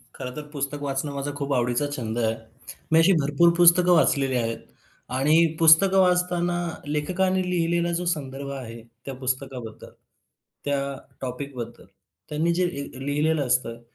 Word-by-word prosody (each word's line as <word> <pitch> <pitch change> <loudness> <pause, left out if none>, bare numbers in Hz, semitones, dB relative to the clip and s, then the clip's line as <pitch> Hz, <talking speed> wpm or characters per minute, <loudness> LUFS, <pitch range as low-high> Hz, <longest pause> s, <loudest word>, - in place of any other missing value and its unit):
खरं 125 - -6
तर 150 -1 -7
पुस्तक 145 -1 -4
वाचणं 140 +1 -2
माझा 140 +1 -3
खूप 140 0 -2
आवडीचा 125 +2 +1
छंद 115 -3 -4
आहे. 110 -1 +1 0.6
मी 160 - +6
अशी 165 +4 +5
भरपूर 145 +5 +3
पुस्तकं 175 +1 +6
वाचलेली 135 -5 +2
आहेत. 115 -1 -1 0.6
आणि 155 +5 +4
पुस्तकं 170 +4 +6
वाचताना 180 -1 +1 0.3
लेखकांनी 185 +6 0
लिहिलेला 170 -1 0
जो 180 - -4
संदर्भ 140 -2 -7
आहे, 115 -4 -7 0.2
त्या 135 - -5
पुस्तकाबद्दल, 130 -3 -5 0.7
त्या 145 -1 0 0.4
टॉपिकबद्दल, 125 -2 -6 0.4
त्यांनी 160 +3 0
जे 180 +1 +1
ए 140 -5 -5 0.2
लिहिलेलं 150 +1 +1
असतं, 120 -2 -1
145 Hz, 140 wpm, -24 LUFS, 130-170 Hz, 0.7 s, मी